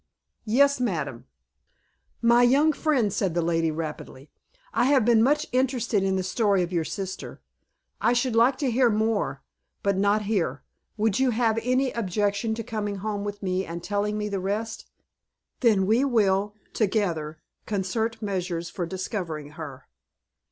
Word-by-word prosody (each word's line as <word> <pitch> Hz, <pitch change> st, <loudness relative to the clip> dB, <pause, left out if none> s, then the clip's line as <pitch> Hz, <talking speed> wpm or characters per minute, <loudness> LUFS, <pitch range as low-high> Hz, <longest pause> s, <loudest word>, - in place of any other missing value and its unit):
"Yes, 280 Hz, +5 st, +4 dB
madam." 150 Hz, -, -2 dB, 1.0 s
"My 235 Hz, +1 st, +5 dB
young 280 Hz, +6 st, +4 dB
friend," 265 Hz, -, +1 dB
said 190 Hz, -5 st, -1 dB
the 170 Hz, -, +2 dB
lady, 165 Hz, -1 st, +1 dB
rapidly, 155 Hz, -3 st, -6 dB, 0.4 s
"I 235 Hz, -, +2 dB
have 265 Hz, -4 st, +4 dB
been 230 Hz, -2 st, +5 dB
much 295 Hz, +5 st, +3 dB
interested 250 Hz, -5 st, +1 dB
in 190 Hz, 0 st, +1 dB
the 190 Hz, -, 0 dB
story 195 Hz, 0 st, +2 dB
of 175 Hz, +1 st, -5 dB
your 170 Hz, -2 st, +1 dB
sister. 190 Hz, +4 st, -6 dB, 0.6 s
I 235 Hz, -, +3 dB
should 245 Hz, -1 st, 0 dB
like 245 Hz, +3 st, +4 dB
to 270 Hz, -3 st, 0 dB
hear 245 Hz, +1 st, +4 dB
more, 215 Hz, -10 st, 0 dB, 0.4 s
but 200 Hz, -1 st, +2 dB
not 205 Hz, +2 st, +2 dB
here. 200 Hz, -5 st, -1 dB, 0.3 s
Would 215 Hz, 0 st, +1 dB
you 265 Hz, -1 st, +3 dB
have 225 Hz, -1 st, +1 dB
any 255 Hz, +2 st, +1 dB
objection 205 Hz, +1 st, -1 dB
to 230 Hz, -, -4 dB
coming 210 Hz, -2 st, -3 dB
home 200 Hz, +1 st, -3 dB
with 205 Hz, 0 st, -5 dB
me, 185 Hz, 0 st, 0 dB
and 170 Hz, 0 st, -7 dB
telling 205 Hz, +1 st, -1 dB
me 210 Hz, 0 st, -2 dB
the 200 Hz, -2 st, -2 dB
rest? 215 Hz, +4 st, -3 dB, 0.7 s
Then 215 Hz, -6 st, +3 dB
we 225 Hz, +6 st, +3 dB
will, 205 Hz, -5 st, +2 dB, 0.2 s
together, 170 Hz, -8 st, -1 dB, 0.3 s
concert 220 Hz, +3 st, -2 dB
measures 180 Hz, -4 st, -3 dB
for 175 Hz, -3 st, -3 dB
discovering 175 Hz, -5 st, -4 dB
her." 145 Hz, -4 st, -9 dB
210 Hz, 155 wpm, -26 LUFS, 185-235 Hz, 1.0 s, My